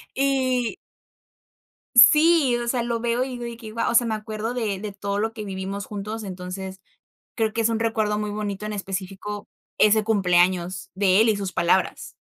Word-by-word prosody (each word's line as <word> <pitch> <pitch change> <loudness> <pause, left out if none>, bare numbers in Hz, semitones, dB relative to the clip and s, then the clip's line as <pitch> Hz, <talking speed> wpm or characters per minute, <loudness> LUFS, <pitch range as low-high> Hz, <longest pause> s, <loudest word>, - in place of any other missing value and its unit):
Y 260 -3 +1 1.2
Sí, 300 +1 +7
o 240 0 -3
sea, 240 -1 0
lo 235 -1 -2
veo 240 +2 0
y - - -6
digo 245 -1 -6
de 235 -1 -6
que 220 -2 -9
guau, 230 - 0
o - - -1
sea, 240 0 +5
me 220 - -1
acuerdo 215 +2 -4
de 215 -6 -2
de 210 0 -6
todo 200 0 -3
lo 225 +1 -1
que 220 -2 -6
vivimos 195 0 -5
juntos. 215 +2 -6
Entonces, 190 0 -7 0.6
creo 220 -2 0
que 230 - 0
es 225 - +2
un 225 -1 -1
recuerdo 220 -2 0
muy 210 0 -3
bonito, 205 -1 -4
en 215 - -4
específico, 195 +1 -5 0.3
ese 215 0 +4
cumpleaños 180 -3 +1
de 190 0 +3
él 225 - +4
y 215 - +3
sus 195 -2 -4
palabras. 175 +2 0
215 Hz, 190 wpm, -24 LUFS, 195-235 Hz, 1.2 s, Sí